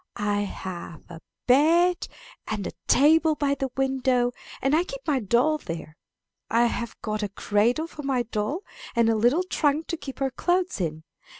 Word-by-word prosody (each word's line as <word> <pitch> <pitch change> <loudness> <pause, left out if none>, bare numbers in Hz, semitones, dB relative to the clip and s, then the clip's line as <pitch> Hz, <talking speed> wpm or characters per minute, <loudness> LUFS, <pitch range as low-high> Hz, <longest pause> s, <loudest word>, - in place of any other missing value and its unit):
I 205 0 0
have 180 -5 -6
a 165 -1 -10 0.2
bed, 335 +7 +4 0.4
and 210 -3 -3
a - - -3 0.2
table 315 +3 +5
by 285 -1 +1
the 270 -1 -2
window; 260 -2 +1 0.3
and 270 +3 +2
I 335 - +3
keep - - -8
my 290 -4 +1
doll 250 +8 +2
there. 165 - -7 0.5
I 230 +2 +4
have 235 -1 -3
got 215 0 -2
a 205 - -2
cradle 215 - +1
for 320 -2 -9
my 270 -3 0
doll, 235 - -3 0.3
and 235 -1 +4
a - - +2
little 245 +11 +3
trunk 310 -3 0
to 335 - -2
keep 270 -3 -8
her 270 -1 -1
clothes 355 - 0
in. 160 -2 -3
260 Hz, 175 wpm, -25 LUFS, 215-310 Hz, 0.5 s, table